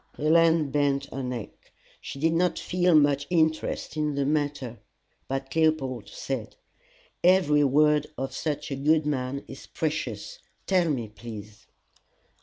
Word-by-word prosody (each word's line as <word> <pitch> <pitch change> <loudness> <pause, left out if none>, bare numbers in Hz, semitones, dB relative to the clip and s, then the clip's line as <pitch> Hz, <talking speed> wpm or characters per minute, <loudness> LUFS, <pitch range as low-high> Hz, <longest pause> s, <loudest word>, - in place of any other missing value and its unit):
Helen 160 -1 +3
bent 140 -1 +1
her 135 - -3
neck: 125 -4 -7 0.3
she - - -7
did 160 +3 +1
not 180 +2 +1
feel 180 -1 +2
much 145 -1 +3
interest 160 -3 0
in 150 -2 -1
the 140 -1 0
matter. 145 -5 -1 0.5
But 135 +1 -4
Leopold 155 -5 +1
said, - - -5 0.7
"Every 170 -5 +5
word 150 +2 +3
of 135 +1 -4
such 150 -2 -3
a - - -1
good 150 +3 +2
man 140 -1 -2
is 135 - -10
precious: 160 - -3 0.3
tell 180 -3 +2
me, 125 -7 -1
please." 105 -1 -10
145 Hz, 135 wpm, -26 LUFS, 135-160 Hz, 0.7 s, Every